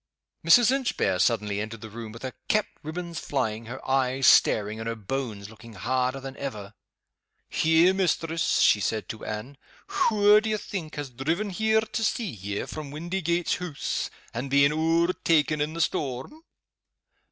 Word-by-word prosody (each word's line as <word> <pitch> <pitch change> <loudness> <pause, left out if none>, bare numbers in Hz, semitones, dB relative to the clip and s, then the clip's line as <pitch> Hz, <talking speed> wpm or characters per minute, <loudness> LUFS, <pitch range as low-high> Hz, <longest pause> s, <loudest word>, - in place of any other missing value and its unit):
Mrs. 225 +9 +6
Inchbare 240 - 0
suddenly 105 -2 +1
entered 110 0 -6
the 110 - -8
room 115 0 -7
with 115 +3 -11
her 130 -1 -4
cap 215 0 +2 0.2
ribb 155 +3 -6
ons 170 -2 -4
flying, 115 -5 -2
her 120 - -8
eyes 130 0 +1
staring, 105 +1 +4
and 115 - -5
her 115 - -3
bones 110 -2 -4
looking 110 +1 -13
harder 130 +6 -1
than 135 0 -8
ever. 105 -7 -6 0.9
"Eh, 160 +3 +5
mistress!" 165 -3 +1
she 105 - +5
said 110 +2 -2
to 110 - -7
Anne. 110 +7 -6 0.5
"Wha 210 -1 +6
do 220 +1 -3
ye 215 - +1
think 175 -7 -6
has 145 -3 -5
driven 165 - -2
here 220 +3 +2
to 220 +1 -3
see 225 +2 0
ye, 100 0 -4
from 155 -2 -7
Windygates 170 +2 -1
Hoose, 175 -5 -3 0.2
and 125 +4 -4
been 140 +1 +5
owertaken 165 -1 +2
in 155 +2 -2
the 165 - -1
storm?" 140 - -2
140 Hz, 165 wpm, -26 LUFS, 115-170 Hz, 0.9 s, Mrs